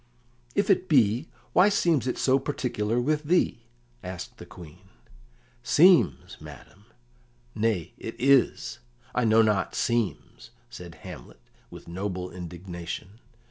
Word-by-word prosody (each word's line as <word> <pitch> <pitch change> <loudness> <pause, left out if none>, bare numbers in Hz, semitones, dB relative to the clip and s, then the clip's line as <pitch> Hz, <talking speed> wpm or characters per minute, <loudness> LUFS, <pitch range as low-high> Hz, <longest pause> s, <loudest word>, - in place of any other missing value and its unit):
"If 200 - +2
it 185 -1 +1
be, 125 0 +3 0.2
why 185 +3 +6
seems 165 - +1
it 125 - -2
so 135 +1 +3
particular 125 -5 -2
with 150 +4 0
thee?" 145 -8 +1 0.4
asked 90 -1 -8
the - - -10
Queen. 90 +2 -14 0.7
"'Seems' 170 +8 +4
madam! 100 +2 -13 0.7
Nay, 110 -6 -1
it - - -7
is; 135 -2 +2 0.3
I 125 - +1
know 110 0 +5
not 105 -2 0
'seems,'" 115 -4 -2 0.2
said - - -10
Hamlet, - - -10 0.3
with - - -12
noble 90 0 -4
indignation. 90 +3 -8
115 Hz, 120 wpm, -26 LUFS, 95-140 Hz, 0.7 s, why